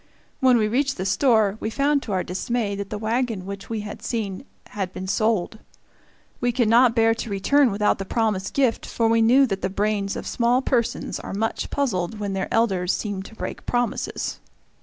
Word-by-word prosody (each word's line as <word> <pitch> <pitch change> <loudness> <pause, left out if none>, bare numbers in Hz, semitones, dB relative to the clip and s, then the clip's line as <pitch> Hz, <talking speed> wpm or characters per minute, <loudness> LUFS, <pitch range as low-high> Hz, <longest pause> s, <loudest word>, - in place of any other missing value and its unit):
When 260 -3 +5
we 215 -2 +2
reached 270 +5 0
the 185 - -3
store, 215 0 +3
we 220 - -2
found 280 +4 +1
to 220 - -6
our 185 -2 0
dismay 205 +3 -2
that 200 0 -5
the 210 - -4
wagon 225 -2 -1
which 200 0 -7
we 225 -2 -2
had 210 0 -8
seen 215 -1 -3 0.2
had 195 -3 -4
been 190 0 -6
sold. 215 0 0 0.8
We 245 0 +1
could 240 -1 +1
not 235 +1 +5
bear 225 -1 +4
to 230 0 -5
return 255 +8 +3
without 205 0 +1
the 195 - -4
promised 210 -3 -1
gift, 260 -5 +2
for 230 - 0
we 230 0 +3
knew 255 +5 +6
that 195 -6 -3
the - - -1
brains 200 0 -1
of - - -5
small 240 +1 +2
persons 235 -4 -1
are - - -6
much 225 +2 -2
puzzled 220 -7 -1
when 205 -1 -3
their 190 0 -3
elders 190 -6 +2
seem 205 -3 -3
to 210 +3 -12
break - - -6
promises. 245 -1 -2
220 Hz, 200 wpm, -23 LUFS, 195-240 Hz, 0.8 s, knew